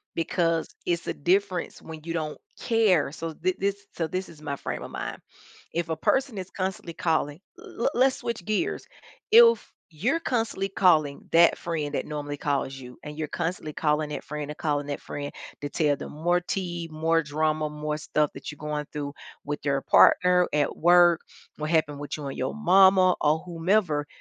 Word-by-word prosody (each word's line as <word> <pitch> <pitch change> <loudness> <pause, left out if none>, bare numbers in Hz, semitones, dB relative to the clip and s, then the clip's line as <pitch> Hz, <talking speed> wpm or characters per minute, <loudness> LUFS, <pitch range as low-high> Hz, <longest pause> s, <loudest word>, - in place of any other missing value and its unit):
because 165 0 0 0.2
it's 170 -1 -1
a - - -1
difference 180 +2 0
when 160 -1 -9
you 165 - -5
don't 155 -2 -3 0.2
care, 210 -11 +3
so 165 0 -5
thi 185 +4 -1
this 200 +1 -2
so 165 - -2
this 185 +3 -3
is 155 -2 -14
my 140 -2 -4
frame - - -5
of - - -8
mind, - - -5 0.6
if 170 0 -1
a 160 - -1
person 255 - +1
is 185 0 -6
constantly 185 -2 -4
calling 160 -2 0 0.2
le - - -2
let's 260 +2 +3
switch 235 -6 -4
gears, 215 +1 -1 0.5
if 465 +1 +6 0.2
you're 245 - 0
constantly 225 -8 -1
calling 155 -7 +2
that 170 0 +6
friend 155 -4 -3
that - - -2
normally 145 -1 -5
calls 140 -2 -1
you 125 -2 -10
and 150 0 -8
you're 155 -1 -2
constantly 165 -2 -3
calling 150 0 +1
that 150 - -5
friend 150 -1 -5
and 150 - -7
calling 145 -2 -1
that 145 -1 -4
friend 145 0 -5 0.3
to 145 - -3
tell 150 -1 +1
them - - -8
more 175 +4 +1
tea, 175 -2 -4
more 165 +1 +1
drama, 155 +1 0
more 150 0 -4
stuff 150 -1 0
that - - -7
you're 150 - -10
going 150 0 -4
through 145 -1 -4 0.3
with 145 0 -3
your 140 -1 +1
partner, 180 0 +5
at 150 -1 +1
work, 175 0 +5 0.4
what 150 0 -3
happened 155 -3 +1
with 145 -1 -5
you 150 -2 -7
and 135 - -5
your 130 - -2
mama 190 -2 +5
or 155 +1 +2
whomever, 170 -3 0
160 Hz, 185 wpm, -26 LUFS, 150-180 Hz, 0.6 s, if